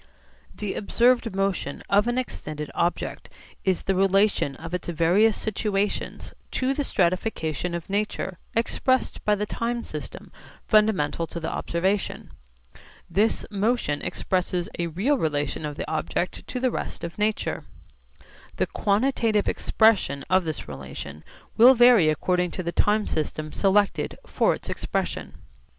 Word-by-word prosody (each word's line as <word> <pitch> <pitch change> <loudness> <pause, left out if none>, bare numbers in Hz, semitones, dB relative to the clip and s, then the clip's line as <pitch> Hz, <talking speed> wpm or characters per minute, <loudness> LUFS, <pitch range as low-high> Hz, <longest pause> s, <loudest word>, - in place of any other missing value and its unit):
The 210 -2 -3
observed 240 0 +2
motion 195 -7 -1
of 205 +3 +3
an 240 +1 0
extended 155 - -4
object 175 +1 -2 0.3
is 190 -2 +1
the 195 - +1
relation 195 -6 +2
of 165 +4 -8
its 180 - -3
various 175 +6 +3
situations 205 -1 -2 0.2
to 260 +1 +1
the 290 - -1
stratification 180 - 0
of 170 - -5
nature 195 -2 -2 0.2
expressed 255 +2 +1
by 210 - +4
the 210 +1 -2
time 235 +2 -2
system - - -8 0.4
fundamental 210 -7 +2
to 170 - -6
the 160 - -3
observation. 190 +4 -1 0.8
This 210 +6 +1
motion 205 -8 0
expresses 180 -1 -1
a 170 - 0
real 215 - +1
relation 150 0 -1
of 145 - -6
the - - -5
object 160 +3 -2
to 250 - -3
the 255 0 +1
rest - - -5
of 170 +4 -6
nature. 210 +1 -1 0.9
The - - +1
quantitative 215 0 +1
expression 195 -11 +2
of 185 -1 +4
this 155 -1 -4
relation 70 +1 -8 0.3
will 250 +4 +9
vary 240 -9 +7
according 180 +3 +1
to 185 - -2
the 170 - -2
time 210 +3 +2
system 155 0 -3
selected 200 +2 +1
for - - +2
its - - -12
expression. - - -3
195 Hz, 135 wpm, -25 LUFS, 165-220 Hz, 0.9 s, will